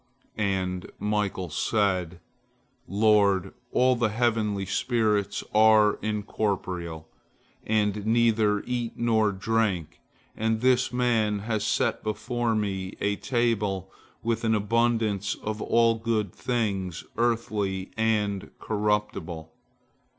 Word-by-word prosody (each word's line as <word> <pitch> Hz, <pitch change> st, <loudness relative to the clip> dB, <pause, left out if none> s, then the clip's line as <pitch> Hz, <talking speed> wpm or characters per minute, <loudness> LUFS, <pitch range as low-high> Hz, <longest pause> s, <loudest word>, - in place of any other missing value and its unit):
And 95 Hz, -3 st, -2 dB
Michael 105 Hz, -4 st, -1 dB
said, 90 Hz, -2 st, 0 dB, 0.7 s
"Lord, 100 Hz, -2 st, +3 dB, 0.2 s
all 130 Hz, 0 st, +3 dB
the 120 Hz, -2 st, +1 dB
heavenly 110 Hz, -3 st, 0 dB
spirits 105 Hz, -1 st, 0 dB
are 110 Hz, -1 st, +5 dB
incorporeal, 95 Hz, -6 st, -3 dB, 0.6 s
and 105 Hz, -1 st, 0 dB
neither 110 Hz, -3 st, +3 dB
eat 120 Hz, -2 st, -2 dB
nor 110 Hz, -3 st, +2 dB
drink, 95 Hz, -6 st, -1 dB, 0.4 s
and 110 Hz, 0 st, 0 dB
this 130 Hz, -1 st, +3 dB
man 115 Hz, -4 st, +1 dB
has 110 Hz, -2 st, -1 dB
set -, -, 0 dB
before 115 Hz, +2 st, -1 dB
me 95 Hz, -3 st, -2 dB
a 100 Hz, 0 st, 0 dB
table 105 Hz, -6 st, -1 dB, 0.3 s
with 115 Hz, 0 st, -1 dB
an 110 Hz, -1 st, +2 dB
abundance 110 Hz, -2 st, +1 dB
of 110 Hz, 0 st, -5 dB
all 115 Hz, 0 st, +3 dB
good 110 Hz, -4 st, -1 dB
things 100 Hz, -8 st, -2 dB
earthly 105 Hz, -5 st, -1 dB
and 105 Hz, -3 st, 0 dB
corruptible. 105 Hz, -6 st, -2 dB
105 Hz, 100 wpm, -26 LUFS, 100-115 Hz, 0.7 s, are